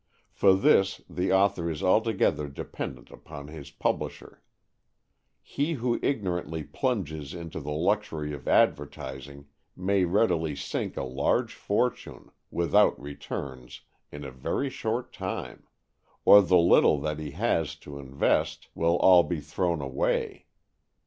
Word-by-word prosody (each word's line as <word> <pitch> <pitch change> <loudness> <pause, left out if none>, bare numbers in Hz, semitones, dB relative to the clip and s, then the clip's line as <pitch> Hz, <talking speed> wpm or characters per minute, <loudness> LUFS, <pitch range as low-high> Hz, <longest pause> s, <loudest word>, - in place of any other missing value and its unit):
For 95 -1 +4
this 95 0 +3
the 90 +1 -2
author 95 -3 +2
is 80 -2 -4
altogether 100 -6 +2
dependent 65 -2 -7
upon 70 -1 -10
his 75 -2 -9
publisher. 70 - -4 1.0
He 145 +4 -2
who 120 -4 -1
ignorantly 90 - -2
plunges 80 - -3
into 85 -2 -6
the 75 -1 -7
luxury 80 -2 -1
of 70 -3 -9
advertising 70 +2 0 0.3
may 95 0 +1
readily 85 -5 +1
sink 70 - -4
a - - -2
large 65 +2 0
fortune, - - -2 0.2
without 100 +5 +3
returns, 70 -3 -7 0.3
in 75 0 -8
a 70 - -7
very 100 - -2
short 115 +2 -3
time. - - -6 0.6
Or 100 - +9
the 90 -1 +4
little 85 -3 +5
that 75 0 -3
he 75 -1 -5
has 95 -8 0
to 70 -1 -8
invest 70 0 -1
will 85 +1 +1
all 90 -1 +7
be 85 -1 -3
thrown 85 +1 -2
away. 65 -1 -2
85 Hz, 130 wpm, -27 LUFS, 70-95 Hz, 1.0 s, Or